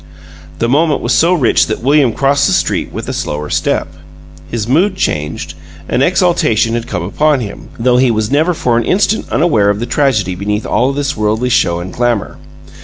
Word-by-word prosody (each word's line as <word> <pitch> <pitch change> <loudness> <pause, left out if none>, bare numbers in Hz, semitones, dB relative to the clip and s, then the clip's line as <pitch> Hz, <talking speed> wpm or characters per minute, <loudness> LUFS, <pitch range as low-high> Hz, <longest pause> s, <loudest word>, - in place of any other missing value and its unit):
The 115 - 0
moment 150 +4 +1
was - - 0
so 170 +2 +3
rich 130 -9 +2
that 110 +1 -4
William 140 -2 +3
crossed 140 +3 +1
the - - +1
street - - -1
with - - -6
a - - -3
slower 75 0 -4
step. - - 0 0.6
His 115 -2 -3
mood 180 +10 +2
changed: 75 - -3 0.3
an - - 0
exaltation 155 - +2
had 120 0 -3
come 90 -4 -3
upon 150 - +1
him, 105 -5 -7
though 125 +1 +2
he 130 0 +3
was 110 -1 -1
never 160 +5 +2
for 120 -5 +1
an - - -1
instant 205 - 0
unaware 115 -11 +2
of 100 0 0
the 120 - -2
tragedy 120 -9 0
beneath 105 +3 -3
all 130 +3 +1
this 140 0 -2
worldly 110 +3 0
show 85 -7 +1
and 90 +2 -7
glamor. 120 -4 -1
120 Hz, 190 wpm, -14 LUFS, 105-145 Hz, 0.6 s, so